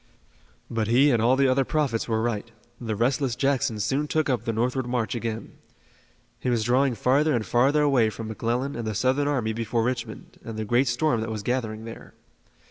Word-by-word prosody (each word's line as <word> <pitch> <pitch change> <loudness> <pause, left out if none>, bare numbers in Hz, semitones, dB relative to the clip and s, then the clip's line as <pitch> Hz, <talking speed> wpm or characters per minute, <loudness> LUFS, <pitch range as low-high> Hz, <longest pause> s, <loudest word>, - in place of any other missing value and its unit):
But 110 -2 -2
he 130 +6 +4
and 120 -3 +2
all 120 +3 +4
the 135 0 +3
other 130 +1 +3
prophets 145 -7 -1
were 110 -1 0
right. 115 -1 -2 0.3
The 110 -3 -3
restless 125 +2 0
Jackson 135 -4 0
soon 140 +8 0
took 155 -2 0
up 125 - -2
the 115 - 0
northward 125 +3 -1
march 120 -2 -1
again. 115 -2 -5 0.8
He - - -2
was 120 -3 +1
drawing 125 +2 +2
farther 140 +6 +2
and 110 -3 -1
farther 140 +5 +3
away 130 -6 +3
from 110 +1 -7
McClellan 120 +5 -2
and 115 -2 -4
the 110 - -3
Southern 130 +6 +1
army 120 -7 0
before 115 +1 -1
Richmond, 120 -2 -4
and 115 -1 -7
the 110 - -3
great 120 +5 +2
storm 120 0 +1
that 110 - -3
was 110 -2 -4
gathering 110 -2 -2
there. 115 - -10
120 Hz, 200 wpm, -25 LUFS, 115-135 Hz, 0.8 s, he